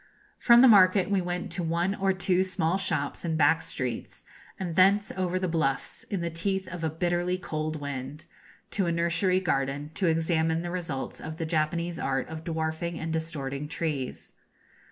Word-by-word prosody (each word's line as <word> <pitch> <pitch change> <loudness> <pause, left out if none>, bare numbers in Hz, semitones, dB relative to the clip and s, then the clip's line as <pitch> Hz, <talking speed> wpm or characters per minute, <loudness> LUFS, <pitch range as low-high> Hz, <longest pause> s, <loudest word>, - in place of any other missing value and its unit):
From 240 0 +7
the - - +9
market 190 -3 +6
we 195 -2 +3
went 180 0 -3
to 180 - -2
one 170 +3 0
or 195 -1 +1
two 185 0 +2
small 185 -1 0
shops 155 -7 -1
in 165 -2 -1
back 160 +2 +4
streets, 125 -3 -4 0.4
and 175 -4 -3
thence 200 +3 +4
over 185 -1 -1
the 185 0 -1
bluffs, 160 -5 -1
in 195 -4 -3
the 170 0 -2
teeth 190 +3 -1
of 170 -1 -7
a 160 - +1
bitterly 175 +2 0
cold 155 -3 -3
wind, 140 +1 -6 0.5
to 195 -4 0
a - - +1
nursery 170 +2 +2
garden, 145 -3 -1
to 190 - 0
examine 160 0 +1
the 175 - -4
results 165 -7 -4
of 155 +1 -6
the 165 - -2
Japanese 170 +2 -1
art 135 0 -1
of 160 0 -7
dwarfing 160 +1 -3
and 160 0 -3
distorting 150 -3 -3
trees. 150 -5 -4
170 Hz, 175 wpm, -28 LUFS, 155-185 Hz, 0.5 s, the